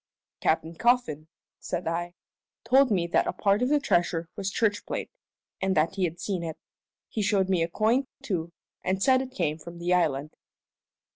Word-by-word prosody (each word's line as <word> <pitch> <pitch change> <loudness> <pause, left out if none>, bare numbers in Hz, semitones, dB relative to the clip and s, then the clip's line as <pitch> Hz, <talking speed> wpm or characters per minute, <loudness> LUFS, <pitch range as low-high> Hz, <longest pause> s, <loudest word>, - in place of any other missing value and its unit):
"Captain 160 +1 +1
Coffin," 230 - +1 0.3
said 175 -1 -4
I, 175 +1 -2 0.5
"told 265 +3 +5
me 185 -5 +2
that 170 - +2
a - - -1
part 200 +1 +2
of 250 - +2
the 295 0 +4
treasure 170 - +1
was 195 -1 -2
church 210 +1 +1
plate, - - -4 0.5
and 190 -1 +1
that 155 +4 +3
he 195 -2 +1
had 170 0 -4
seen 190 -4 -2
it. 160 -2 -5 0.5
He 220 - -3
showed 200 -2 +2
me 185 -3 +2
a 165 - +2
coin, 225 +9 +1 0.2
too, 170 -8 -2 0.3
and 190 +1 0
said 260 -1 +5
it 265 - -5
came 155 -10 -2
from 170 +2 -10
the 175 +1 0
island." 155 -4 +1
185 Hz, 185 wpm, -27 LUFS, 165-215 Hz, 0.5 s, told